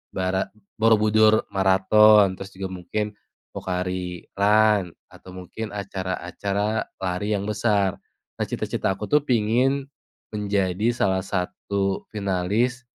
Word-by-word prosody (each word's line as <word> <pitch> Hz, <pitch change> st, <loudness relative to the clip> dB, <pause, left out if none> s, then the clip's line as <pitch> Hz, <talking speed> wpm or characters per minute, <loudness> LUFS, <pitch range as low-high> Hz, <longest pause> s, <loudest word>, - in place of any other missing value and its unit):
bara 95 Hz, 0 st, 0 dB, 0.3 s
Borobudur 110 Hz, -1 st, +4 dB
Marathon, 95 Hz, +1 st, +5 dB
terus 95 Hz, 0 st, -8 dB
juga 95 Hz, 0 st, -5 dB
mungkin 95 Hz, +4 st, -3 dB, 0.4 s
Pocari 90 Hz, -1 st, -4 dB
Run, 105 Hz, -2 st, +3 dB, 0.2 s
atau 95 Hz, -, -14 dB
mungkin 95 Hz, +4 st, -7 dB
acara-acara 100 Hz, +2 st, -3 dB, 0.2 s
lari 95 Hz, +3 st, -1 dB
yang 100 Hz, -, -2 dB
besar. 105 Hz, -3 st, +1 dB, 0.4 s
Nah, -, -, 0 dB
cita-cita -, -, -2 dB
aku 105 Hz, -, -5 dB
tuh 150 Hz, 0 st, +5 dB
pengin 125 Hz, +4 st, +2 dB, 0.5 s
menjadi 100 Hz, -1 st, 0 dB
salah 95 Hz, -5 st, +1 dB
satu 95 Hz, +1 st, -2 dB
finalis, 105 Hz, +5 st, 0 dB
100 Hz, 105 wpm, -24 LUFS, 95-110 Hz, 0.5 s, Marathon